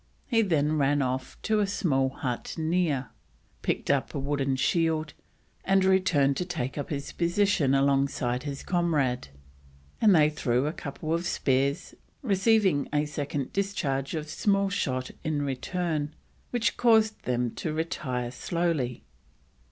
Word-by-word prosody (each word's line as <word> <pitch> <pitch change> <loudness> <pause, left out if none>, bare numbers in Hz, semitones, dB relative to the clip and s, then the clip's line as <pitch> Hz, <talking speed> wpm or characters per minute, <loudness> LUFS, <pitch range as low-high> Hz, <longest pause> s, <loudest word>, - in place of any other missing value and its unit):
He 230 -3 +2
then 155 -6 +1
ran 145 0 +2
off 130 0 -3
to 215 -1 +2
a 205 - +2
small 135 -9 +1
hut 125 -2 -4
near, 160 -6 0 0.5
picked - - 0
up 140 +2 0
a - - -1
wooden 135 -1 0
shield, 155 +2 +1 0.5
and 195 0 +3
returned 180 -8 +3
to - - 0
take 155 -8 -3
up 145 - -4
his 145 -2 -4
position 170 -5 +2
alongside 135 -2 +1
his 140 -2 -5
comrade, 150 - 0 0.7
and 210 -4 +6
they 150 -1 +5
threw 125 -3 0
a 155 - -1
couple 155 +2 -4
of 170 +1 -1
spears, 135 -1 0 0.3
receiving 200 - +2
a 150 0 +1
second 145 -2 -4
discharge 155 -9 -1
of 155 -1 -4
small 195 +4 +1
shot 130 -9 -1
in 150 -2 -1
return, 150 +2 -2 0.3
which 240 -2 0
caused 220 -2 +3
them 125 -1 0
to 160 - -4
retire 130 -6 -2
slowly. 155 -4 -1
150 Hz, 140 wpm, -27 LUFS, 135-180 Hz, 0.7 s, and